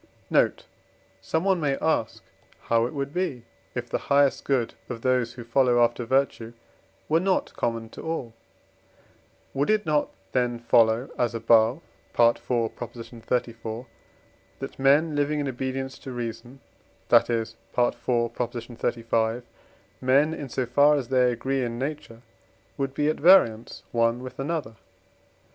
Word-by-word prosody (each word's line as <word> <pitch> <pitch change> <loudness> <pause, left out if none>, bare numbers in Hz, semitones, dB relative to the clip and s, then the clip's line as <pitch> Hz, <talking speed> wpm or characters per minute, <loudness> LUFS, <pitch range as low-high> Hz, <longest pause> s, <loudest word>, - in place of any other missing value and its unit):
Note. - - +2 0.6
Someone 175 - +1
may 140 -2 0
ask 115 -8 -1 0.4
how 115 0 +2
it - - -9
would 140 0 -3
be, 170 -10 -2 0.3
if - - -3
the - - -2
highest 140 -1 +3
good 130 -5 0 0.2
of 115 -2 -6
those 125 -2 +1
who 120 0 -9
follow 120 0 +3
after 120 +1 0
virtue 125 -3 0 0.5
were 160 +2 +3
not 185 +1 0
common 115 -1 -2
to - - -10
all? 160 -8 -4 1.2
Would 140 +2 0
it 215 -2 +2
not 150 -2 +1 0.2
then 125 -2 0
follow, 115 +1 +3
as 120 -1 +1
above 115 +4 +3 0.4
(IV. 120 0 +6
xxxiv.), 115 0 -3 0.7
that - - -8
men 145 +4 +4
living 145 +1 0
in 145 - -1
obedience 130 +1 -4
to 130 - -8
reason, 120 +2 -6 0.5
that - - +5
is 115 -1 -1 0.3
(IV. 120 0 +3
xxxv.), 120 -1 -1 0.6
men 140 +5 +3
in 145 -4 -6
so 130 +1 -1
far 145 +5 +4
as 135 -5 -3
they 125 -1 +3
agree 130 +3 -1
in 120 -1 -3
nature, 135 -4 -5 0.5
would 135 -1 -3
be 145 +1 +1
at 155 - 0
variance 130 - +4
one 115 +1 +1
with 130 - -9
another? 140 -6 -3
125 Hz, 140 wpm, -25 LUFS, 115-140 Hz, 1.2 s, IV